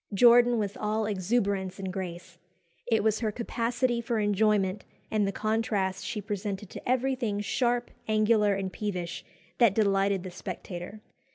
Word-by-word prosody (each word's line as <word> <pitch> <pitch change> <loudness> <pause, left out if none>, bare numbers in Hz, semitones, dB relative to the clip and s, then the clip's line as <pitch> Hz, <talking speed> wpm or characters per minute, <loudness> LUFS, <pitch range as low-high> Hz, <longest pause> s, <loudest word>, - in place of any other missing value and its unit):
Jordan 240 +2 +6
was 205 -2 -2
all 215 +1 -1
exuberance 195 -2 0
and 190 -2 -5
grace. 180 -2 -6 0.5
It 225 -3 +2
was 215 -1 +2
her 220 -3 0
capacity 235 +2 -1
for 235 0 -1
enjoyment, 205 -1 +2 0.3
and 210 -2 +2
the - - 0
contrast 210 -3 -1
she 215 - -3
presented 200 -1 -4
to - - -7
everything 250 -5 0
sharp, 240 +3 0 0.2
angular, 215 -1 +3
and 190 -1 -3
peevish, 180 -5 -4 0.4
that 230 -6 +5
delighted 195 -3 +2
the 185 - -6
spectator. 180 +2 -7
210 Hz, 145 wpm, -28 LUFS, 195-230 Hz, 0.5 s, Jordan